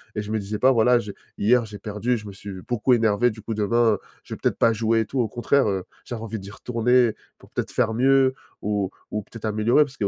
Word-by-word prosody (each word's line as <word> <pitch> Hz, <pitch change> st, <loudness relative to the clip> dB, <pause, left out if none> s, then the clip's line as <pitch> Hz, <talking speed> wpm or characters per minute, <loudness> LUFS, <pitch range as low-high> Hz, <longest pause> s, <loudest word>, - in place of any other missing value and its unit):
et 105 Hz, -, -1 dB
je 105 Hz, 0 st, -7 dB
me 110 Hz, -, 0 dB
disais 105 Hz, +1 st, -4 dB
pas: 130 Hz, -, +5 dB
«Voilà 125 Hz, 0 st, +4 dB
j'ai 105 Hz, -3 st, -6 dB, 0.2 s
hier 120 Hz, +3 st, +3 dB
j'ai 105 Hz, -1 st, -9 dB
perdu, 105 Hz, +4 st, -2 dB
je 105 Hz, -, -10 dB
me 100 Hz, -, -7 dB
suis 95 Hz, -1 st, -9 dB
beaucoup 120 Hz, +4 st, +1 dB
énervé, 115 Hz, +1 st, +3 dB
du 110 Hz, 0 st, -11 dB
coup 115 Hz, -, -4 dB
demain, 110 Hz, +1 st, +2 dB, 0.3 s
je -, -, -8 dB
vais -, -, -5 dB
peut-être -, -, 0 dB
pas 115 Hz, -, +4 dB
jouer», 115 Hz, 0 st, +1 dB
et -, -, -2 dB
tout. 135 Hz, -, -3 dB
Au 120 Hz, -, +2 dB
contraire, 120 Hz, +3 st, +1 dB
heu, 95 Hz, -2 st, -1 dB, 0.2 s
j'avais 120 Hz, -2 st, -6 dB
envie 110 Hz, -1 st, -5 dB
d'y 100 Hz, +1 st, -10 dB
retourner 120 Hz, +1 st, +2 dB, 0.2 s
pour -, -, -19 dB
peut-être -, -, -4 dB
faire 115 Hz, -3 st, +1 dB
mieux 130 Hz, +2 st, +4 dB, 0.3 s
ou 100 Hz, -2 st, -1 dB, 0.2 s
ou 105 Hz, -, -2 dB
peut-être 115 Hz, +2 st, -13 dB
améliorer, 110 Hz, +6 st, +3 dB
parce 140 Hz, -1 st, -10 dB
qu'il 105 Hz, -, -1 dB
y -, -, +3 dB
110 Hz, 255 wpm, -24 LUFS, 105-120 Hz, 0.3 s, pas